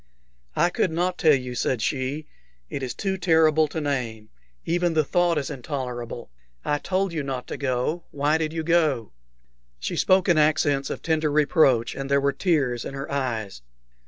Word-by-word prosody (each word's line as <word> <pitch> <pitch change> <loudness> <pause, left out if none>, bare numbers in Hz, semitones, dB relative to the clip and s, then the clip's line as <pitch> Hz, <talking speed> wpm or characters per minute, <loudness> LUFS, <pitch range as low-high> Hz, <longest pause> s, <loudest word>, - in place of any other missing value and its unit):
"I 175 - +3
could 185 - +1
not 180 +3 -1
tell 155 -3 +6
you," 125 -1 -4
said 125 +1 0
she. 135 +5 -2 0.5
"It - - -3
is 130 -2 -4
too 190 -2 -2
terrible 160 -3 +4
to 160 - -4
name. 125 -7 -3 0.4
Even 175 0 +1
the 155 - +4
thought 175 +2 +2
is 145 0 -2
intolerable. 125 - -5 0.3
I 145 0 +1
told 190 +1 -1
you 155 - -1
not 135 -2 -4
to - - -3
go. 135 +5 -1
Why 150 +2 +1
did 155 -1 -1
you 160 0 -3
go?" 155 -9 +1 0.7
She - - -3
spoke 185 0 +3
in 170 -4 +4
accents 145 -2 +2
of - - -5
tender 155 -2 +1
reproach, 145 -5 +3
and 135 0 -5
there 140 0 +4
were 140 0 +1
tears 135 -7 0
in 135 - -6
her 140 +1 -6
eyes. 115 - -3
145 Hz, 180 wpm, -24 LUFS, 130-160 Hz, 0.7 s, tell